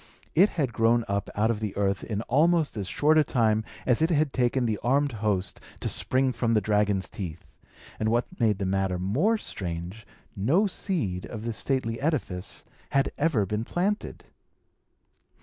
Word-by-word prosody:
It 195 Hz, +6 st, +5 dB
had 135 Hz, -7 st, 0 dB
grown 115 Hz, +1 st, +3 dB
up 100 Hz, -1 st, -2 dB
out 110 Hz, +3 st, +2 dB
of 110 Hz, -, -3 dB
the 105 Hz, -3 st, -4 dB
earth 100 Hz, -1 st, 0 dB
in 105 Hz, -1 st, -3 dB
almost 160 Hz, +4 st, +2 dB
as 100 Hz, -3 st, -3 dB
short 155 Hz, +9 st, +3 dB
a -, -, +5 dB
time 110 Hz, -5 st, +1 dB, 0.2 s
as 125 Hz, +2 st, +2 dB
it 160 Hz, -, +3 dB
had 155 Hz, -4 st, +1 dB
taken 125 Hz, 0 st, +1 dB
the 110 Hz, -3 st, -1 dB
armed 140 Hz, +4 st, +2 dB
host 105 Hz, -3 st, -1 dB, 0.2 s
to -, -, -3 dB
spring 130 Hz, 0 st, +2 dB
from 115 Hz, -1 st, 0 dB
the -, -, +5 dB
dragon's 105 Hz, -2 st, +1 dB
teeth; 90 Hz, -4 st, -8 dB, 0.4 s
and 110 Hz, -, +1 dB
what 120 Hz, +2 st, +2 dB
made 110 Hz, -4 st, +3 dB
the 95 Hz, -, -2 dB
matter 95 Hz, -1 st, 0 dB
more 135 Hz, -, +1 dB
strange, 90 Hz, -, -6 dB, 0.3 s
no 140 Hz, -, +2 dB
seed 160 Hz, -, -2 dB
of 110 Hz, -1 st, -7 dB
this 115 Hz, -2 st, -3 dB
stately 130 Hz, -4 st, -1 dB
edifice 130 Hz, -, -2 dB, 0.2 s
had 135 Hz, 0 st, +1 dB
ever 145 Hz, -9 st, +2 dB
been 105 Hz, +3 st, -2 dB
planted. 195 Hz, -, -2 dB
115 Hz, 170 wpm, -27 LUFS, 100-140 Hz, 0.4 s, It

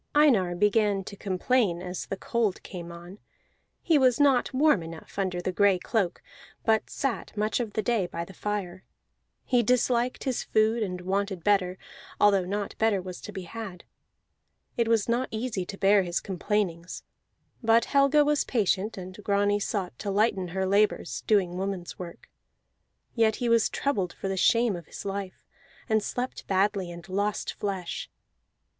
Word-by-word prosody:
Einar 225 Hz, -13 st, +4 dB
began 205 Hz, 0 st, +2 dB
to 200 Hz, -, -8 dB
complain 195 Hz, 0 st, +1 dB
as 180 Hz, 0 st, -5 dB
the 195 Hz, -, -4 dB
cold 220 Hz, -2 st, -1 dB
came 175 Hz, -2 st, -8 dB
on; 175 Hz, +4 st, -11 dB, 0.6 s
he 320 Hz, -4 st, +4 dB
was 255 Hz, -1 st, +4 dB
not 275 Hz, -4 st, +4 dB
warm 270 Hz, -, +3 dB
enough 165 Hz, +4 st, -9 dB
under 185 Hz, -2 st, -1 dB
the 185 Hz, -, -1 dB
gray 200 Hz, 0 st, +4 dB
cloak, 190 Hz, -1 st, -1 dB, 0.4 s
but 220 Hz, -1 st, +2 dB
sat 230 Hz, -, -3 dB
much 215 Hz, +3 st, 0 dB
of 225 Hz, -4 st, -3 dB
the 215 Hz, -, -1 dB
day 225 Hz, -7 st, +1 dB
by 170 Hz, -1 st, -5 dB
the 195 Hz, -, -13 dB
fire. 190 Hz, -3 st, -4 dB, 0.6 s
He 245 Hz, -2 st, +3 dB
disliked 245 Hz, +1 st, +1 dB
his 260 Hz, -3 st, -1 dB
food 220 Hz, +2 st, +2 dB
and 180 Hz, -4 st, -3 dB
wanted 190 Hz, -1 st, -2 dB
better, 190 Hz, -2 st, +2 dB, 0.4 s
although 200 Hz, -3 st, +4 dB
naught 200 Hz, +2 st, -3 dB
better 220 Hz, -3 st, +3 dB
was 185 Hz, -1 st, -7 dB
to 210 Hz, -, -8 dB
be 190 Hz, -3 st, -6 dB
had. 195 Hz, -2 st, -8 dB, 0.9 s
It 235 Hz, -1 st, +1 dB
was 225 Hz, -3 st, +2 dB
not 240 Hz, +2 st, +1 dB
easy 220 Hz, -5 st, -3 dB
to 195 Hz, -, -7 dB
bear 200 Hz, +1 st, +5 dB
his 175 Hz, -2 st, -1 dB
complainings; 185 Hz, -2 st, -2 dB, 0.6 s
but 230 Hz, 0 st, +4 dB
Helga 280 Hz, +1 st, +4 dB
was 295 Hz, 0 st, +2 dB
patient, 210 Hz, -2 st, 0 dB
and 185 Hz, +2 st, -8 dB
Grani 205 Hz, 0 st, +2 dB
sought 195 Hz, -3 st, -3 dB
to 205 Hz, -, -3 dB
lighten 195 Hz, -2 st, +1 dB
her 190 Hz, +2 st, -2 dB
labors, 200 Hz, +2 st, +1 dB
doing 185 Hz, -5 st, +2 dB
woman's 190 Hz, -2 st, -4 dB
work. 175 Hz, -2 st, -9 dB, 0.9 s
Yet 225 Hz, -2 st, +3 dB
he 245 Hz, -, -2 dB
was 230 Hz, -1 st, +4 dB
troubled 195 Hz, -11 st, -1 dB
for -, -, -5 dB
the 195 Hz, -, -1 dB
shame 230 Hz, +2 st, +3 dB
of 170 Hz, -3 st, -9 dB
his -, -, -9 dB
life, 195 Hz, -1 st, -5 dB, 0.4 s
and 220 Hz, -2 st, +2 dB
slept 250 Hz, +4 st, -4 dB
badly, 195 Hz, -1 st, +1 dB
and 170 Hz, 0 st, -10 dB
lost 200 Hz, +2 st, -1 dB
flesh. 190 Hz, -4 st, -4 dB
200 Hz, 165 wpm, -27 LUFS, 185-225 Hz, 0.9 s, bear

